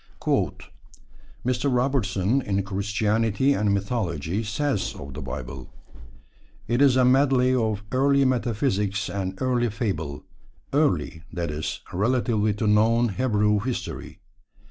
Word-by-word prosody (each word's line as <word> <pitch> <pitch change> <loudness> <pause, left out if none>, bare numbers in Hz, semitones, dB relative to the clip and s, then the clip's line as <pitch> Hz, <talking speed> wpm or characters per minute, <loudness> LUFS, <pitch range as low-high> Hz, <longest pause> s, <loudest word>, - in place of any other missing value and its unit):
Mr. 130 +2 +1
Robertson, 125 -3 +1
in 100 -4 -1
Christianity 105 +5 +1
and 105 -5 +1
Mythology, 100 - -1
says 110 +2 -1
of 70 0 -8
the 75 - -6
Bible: 65 0 -7 1.0
It 120 +3 +1
is 135 -3 +6
a 130 -1 +4
medley 130 -1 +4
of 110 -4 0
early 140 +1 +3
metaphysics 105 -5 0
and 95 -1 -4
early 125 -2 +1
fable 90 - -3 0.5
early, 85 - +1
that 85 -3 -3
is, 75 +1 -4
relatively 110 +1 +1
to 110 - -2
known 115 +3 +3
Hebrew 105 -2 +1
history. 125 +3 -5
110 Hz, 115 wpm, -25 LUFS, 100-125 Hz, 1.0 s, is